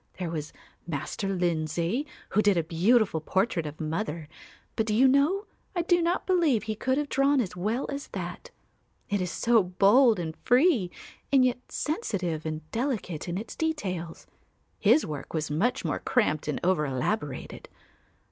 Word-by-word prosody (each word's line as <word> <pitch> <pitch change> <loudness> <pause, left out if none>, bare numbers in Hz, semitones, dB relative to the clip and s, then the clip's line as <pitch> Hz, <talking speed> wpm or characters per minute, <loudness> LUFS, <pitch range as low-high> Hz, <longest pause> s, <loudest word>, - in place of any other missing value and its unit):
There 175 -3 -3
was 155 -2 -4 0.4
Master 170 +5 -3
Lindsay, 175 - -1 0.2
who 210 - +3
did 205 -3 +3
a 170 - +2
beautiful 175 +2 +2
portrait 185 -1 0
of 150 +1 -8
mother, 160 0 -3 0.5
but 220 - 0
do 210 - +1
you 260 +4 +6
know 295 +10 +3 0.3
I 345 - +1
do 350 0 +3
not 340 +2 0
believe 330 - +2
he 220 -1 -2
could 260 +5 0
have 295 0 0
drawn 275 0 +3
as 205 -8 -2
well 215 +8 -1
as 280 0 -5
that; - - -6 0.6
it 205 -1 +1
is 180 - -1
so 230 +4 +3
bold 205 +6 +4
and 160 -2 -4
free 250 - +3 0.4
and 265 -2 +5
yet 250 -1 +1
sensitive 185 - -2
and 155 0 -5
delicate 225 - -2
in 175 - -2
its 215 - -6
details. 190 - -3 0.5
His 310 - +4
work 150 0 -6
was 155 -2 -2
much 245 - 0
more - - -1
cramped 155 - +1
and 150 - -1
over 170 -4 +2
elaborated. 135 +2 -3
200 Hz, 165 wpm, -27 LUFS, 165-260 Hz, 0.6 s, you